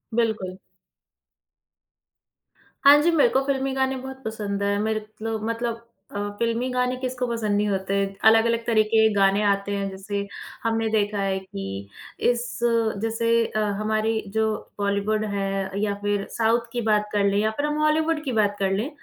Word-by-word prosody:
बिल्कुल। 215 -6 0 2.3
हाँ 285 +1 +10
जी, 340 +2 +3
मेरे 315 -3 +4
को 265 - +2
फ़िल्मी 270 -1 0
गाने 265 0 0
बहुत 265 +1 -8
पसंद 205 -2 -3
है। 200 0 +1
मेरे 215 0 -1 0.2
लो 225 0 -2
मतलब 230 0 -3 0.3
अ, - - -1 0.2
फ़िल्मी 235 +2 0
गाने 250 0 0
किसको 255 -1 -3
पसंद 220 -3 -1
नहीं 210 - +1
होते। 195 0 -1 0.3
अलग-अलग 230 +1 +4
तरह 220 -2 +4
के 220 - +6
गाने 195 0 +3
आते 200 0 +1
हैं 200 -1 -1
जैसे, 200 +1 -4 0.4
हमने 225 0 0
देखा 210 -1 +1
है 195 -1 0
कि 185 - -7 0.6
इस 240 0 -2 0.4
जैसे 225 +1 -1 0.2
अ, 215 - -3 0.2
हमारी 220 +1 0 0.2
जो 220 0 +3 0.3
बॉलीवुड 205 +2 0
है 195 0 -2
या 205 -1 +1
फिर 205 -1 0
साउथ 230 +1 +2
की 240 0 -2
बात 210 0 +3
कर 205 -1 +1
लें 200 0 +2
या 215 +1 +1
फिर 285 - 0
हम 300 0 -1
हॉलीवुड 310 +1 +2
की 265 - -2
बात 205 -1 +2
कर 195 -1 +1
लें। 210 +8 -1
220 Hz, 165 wpm, -24 LUFS, 200-240 Hz, 2.3 s, हाँ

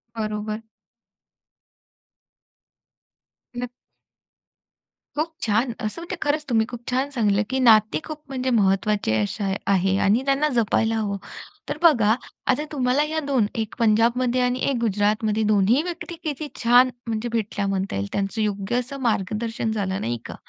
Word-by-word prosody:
बरोबर. 215 0 -3 3.0
नक्क 245 0 -3 1.5
खूप 320 +2 -1
छान! 230 +4 +1
असं 215 +9 -4
म्हणजे 345 +2 -5
खरंच 300 +1 0
तुम्ही 225 -3 +2
खूप 240 -2 -7
छान 260 +3 0
सांगितलं, 215 -6 +2
की 265 - 0
नाते 220 -4 +5
खूप 310 -1 -7
म्हणजे 260 -1 -2
महत्त्वाचे 200 - +2
अशा 195 - -2 0.2
आहे 190 0 +2
आणि 215 +6 +3
त्यांना 275 +2 +2
जपायला 225 -1 +2
हवं. 205 -2 -1 0.5
तर - - -3
बघा 235 -11 +5 0.3
आता 295 +4 +2
तुम्हाला 260 0 +2
ह्या 315 +1 -1
2 260 -7 +2 0.2
1 220 - -7
पंजाबमध्ये 240 +3 +2
आणि 250 0 +1
1 270 - 0
गुजरातमध्ये 215 0 +1
2ही 210 +7 +3
व्यक्ती 345 0 -6
किती 300 -1 -3
छान 245 +2 +6 0.2
म्हणजे 225 +1 -2
भेटल्या 210 -3 -1
म्हणता 195 - -2
येईल 100 +1 -2
त्यांचं 200 +2 -2
योग्य 205 +1 -1
असं 250 +3 -4
मार्गदर्शन 225 0 -1
झालं, 195 -2 -2
नाही 120 +1 -2
का? - - -7
225 Hz, 140 wpm, -23 LUFS, 210-255 Hz, 3.0 s, छान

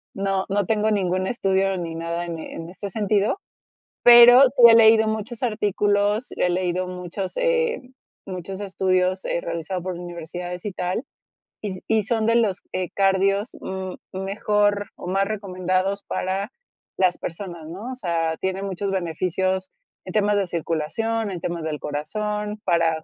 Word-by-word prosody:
no 195 -1 -1
no 200 -1 +1
tengo 215 +1 +1
ningún 185 -2 0
estudio 195 -4 +1
ni 165 -2 -4
nada 170 +1 -3
en 170 -2 -5
en 165 +1 -7
este 200 +2 -7
sentido, 210 - +1 0.7
pero 240 +1 +10
sí 250 -1 +1
he 230 - +8
leído 220 -1 +6
muchos 220 +3 -4
artículos, 210 0 +1
he 180 - +1
leído 180 0 -1
muchos 180 +1 -5
eh, 485 -1 +1 0.5
muchos 190 +1 -6
estudios, 185 -1 0
eh, - - 0
realizados 170 +2 -4
por 185 -1 -3
universidades 175 +1 -7
y 205 - -2
tal, 185 +7 -2 0.6
y 210 - -3
s 185 -1 -7
y 220 -1 +2
son 220 +1 0
de 230 +1 +3
los, 205 -5 +2
eh, 185 -1 -2
cardios, 195 +2 +2
mm, 190 -1 -5 0.2
mejor 205 +1 0
o - - -9
más 195 +2 +1
recomendados 190 -1 -1
para 190 +2 -2 0.5
las 185 -2 +2
personas, 170 -2 -7
¿no? 200 +10 -7
O - - -5
sea, 165 -7 -1
tiene 190 0 -2
muchos 195 0 -3
beneficios 185 +1 -1 0.3
en - - -7
temas 210 -1 +2
de 195 - +1
circulación, 195 +7 -2
en 180 - -5
temas 170 -2 -3
del 155 -2 -3
corazón, 210 +8 -3
para 165 -2 +2
190 Hz, 155 wpm, -23 LUFS, 180-210 Hz, 0.7 s, pero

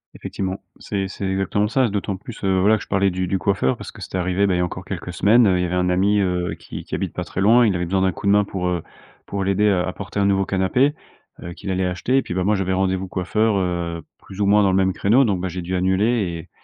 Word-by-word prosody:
Effectivement, 95 0 -5 0.2
c'est 95 -1 -3
c'est 100 - -6
exactement 95 +2 0
ça. 125 +2 +1
D'autant 100 -1 -2
plus, 105 +4 -10
heu, 95 -1 +2
voilà, 105 +3 +4
que 105 - -8
je - - -16
parlais 100 0 +2
du 90 +1 -2
du 95 +2 0
coiffeur 90 -8 +1
parce - - -8
que - - -14
c'était - - -5
arrivé, 95 +2 +1
bah 95 - +1
il - - 0
y - - 0
a - - +2
encore 90 +1 -7
quelques 90 -2 -5
semaines, 110 +7 +4
heu, 90 -2 +2
il - - +1
y - - 0
avait 90 +1 -2
un 90 0 +1
ami, 100 +3 +2
heu, 90 -2 -1
qui - - -9
qui - - -4
habite - - -3
pas - - -4
très 95 - -4
loin. 115 +4 +5
Il 100 - +1
avait 90 0 -1
besoin 95 +2 0
d'un 95 0 +2
coup - - -8
de 100 - +4
main 105 0 +4
pour, 95 -2 -3
heu, 90 -2 -2 0.4
pour 100 -1 -3
l'aider 100 +2 +2
à 90 -3 +2
à 95 - -3
porter 105 0 -5
un - - +2
nouveau 95 -1 +2
canapé, 100 +11 +1 0.5
heu, 85 - -7
qu'il 95 - -8
allait 95 0 0
acheter 90 +9 0
et - - +4
puis 90 - -6
bah 95 0 -1
moi, 105 +1 +3
j'avais 95 -1 -1
rendez-vous 95 0 0
coiffeur, 105 +4 0
heu, 85 -2 -2 0.2
plus 95 - -12
ou 100 - +2
moins 105 +1 +4
dans 95 - +3
le 95 - +2
même 95 -1 +2
créneau. 120 +7 +3
Donc 100 -5 0
bah, 95 - -2
j'ai 90 +1 -5
dû 90 +2 -3
annuler 95 +2 +1 0.3
et 80 - -11
95 Hz, 290 wpm, -21 LUFS, 90-100 Hz, 0.5 s, loin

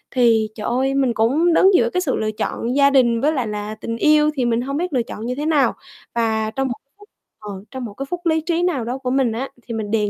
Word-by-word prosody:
Thì 225 -3 +3
trời 210 - -5
ơi, 265 +2 0
mình 265 -3 +2
cũng 280 +11 +2
đứng 385 +4 +5
giữa 235 -7 +3
cái 365 - +1
sự 295 -7 0
lựa 215 0 -1
chọn 230 +3 -3
gia 280 0 +5
đình 240 -4 +3
với 300 +3 +2
lại 255 -6 -1
là 210 0 -4
tình 230 +1 -5
yêu 300 +3 +4
thì 255 -4 0
mình 235 0 +1
hông 275 +3 -3
biết 350 0 -2
lựa 250 -3 +1
chọn 225 -1 -7
như 250 +1 -2
thế 295 +3 -3
nào. 290 -6 +3 0.4
Và 220 -2 0
trong 270 +3 -1
một 245 - -2 0.3
phút 415 +1 -17 0.3
ờ, 210 - -9 0.2
trong 260 -2 -5
một 210 - -8
cái 275 +6 -5
phút 355 0 -5
lí 320 -1 +2
trí 335 +2 -1
nào 330 -9 0
đó 245 +3 -3
của 260 -2 -4
mình 265 -3 +2
á, 245 +5 -4
thì 235 - -7
mình 215 -2 -4
đề 210 -2 +1
255 Hz, 275 wpm, -20 LUFS, 230-295 Hz, 0.4 s, đứng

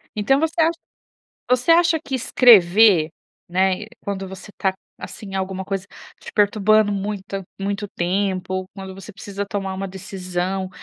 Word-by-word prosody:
Então 215 +6 +2
você 325 +2 0
acha 330 +1 +2 0.7
você 250 +4 +2
acha 335 -1 +5
que 290 -4 -6
escrever, 210 -8 +6 0.4
né, 190 +3 +1 0.2
quando 195 -2 -4
você 190 +2 -10
tá, 190 -1 +1 0.3
assim, 195 -3 -8
alguma 190 0 -3
coisa 195 0 -4 0.3
te - - -9
perturbando 210 0 +3
muita 200 -1 -4 0.2
muito 200 +1 -2
tempo, 185 +1 -1
ou 185 0 -3
quando 190 -1 -8
você 195 +2 -11
precisa 200 0 -6
tomar 195 -1 -3
uma 195 +1 -4
decisão, 185 0 -4
195 Hz, 145 wpm, -21 LUFS, 190-215 Hz, 0.7 s, escrever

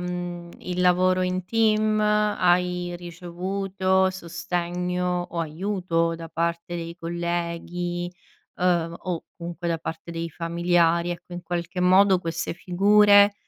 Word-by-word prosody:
mhmm, 175 -1 -5
il 180 0 -3
lavoro 185 +1 +3
in 185 0 -1
team, 215 0 +2
hai 180 -4 +2
ricevuto 185 +2 -1
sostegno 180 0 -2
o 170 - -2
aiuto 165 0 -1
da 165 0 -8
parte 170 +1 -2
dei 170 0 -6
colleghi, 175 +1 -3 0.5
ehm, 175 -2 +1
o 175 -2 -4
comunque 175 0 -6
da 165 - 0
parte 160 +1 -6
dei 165 0 -4
familiari? 170 +1 +1
Ecco, 175 +1 -7
in 175 - -6
qualche 175 +1 -3
modo 190 +1 +5
queste 165 -1 -3
figure, 205 +3 +5
175 Hz, 120 wpm, -25 LUFS, 170-185 Hz, 0.5 s, modo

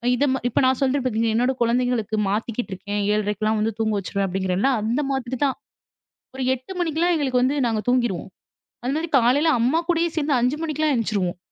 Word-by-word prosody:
இத 280 - +2
ம 265 - -1
இப்ப - - +1
நான் 260 0 +2
சொல்றேன் 270 0 +1
பார்த்தீங்களா, 225 -2 +1
என்னோட 250 +3 +2
கொழந்தைங்களுக்கு 235 -2 +1
மாத்திக்கிட்டு 225 +2 -2
இருக்கேன் 205 +2 -3
7:30க்குலாம் 215 +1 0
வந்து 220 +1 0
தூங்க 220 -1 +1
வச்சுருவேன் 195 0 -2
அப்டிங்கிறேன்ல, 190 +5 0
அந்த 235 +7 0
மாதிரிதான். 260 +1 -1 0.8
ஒரு 265 - -3
8 260 +9 -9
மணிக்கெலாம் 340 +1 +1
எங்களுக்கு 260 -4 +1
வந்து 270 +3 +1
நாங்க 220 -2 -1
தூங்கிருவோம். 240 -7 0 0.6
அந்த 265 - 0
மாரி 330 +1 -3
காலையில 270 +7 +3
அம்மா 275 +8 +2
கூடயே 340 0 +2
சேர்ந்து 290 -2 +1
5 250 +5 +1
மணிக்கெல்லாம் 310 -2 0
எந்திச்சிருவோம். 200 -6 -1
245 Hz, 170 wpm, -23 LUFS, 215-275 Hz, 0.8 s, காலையில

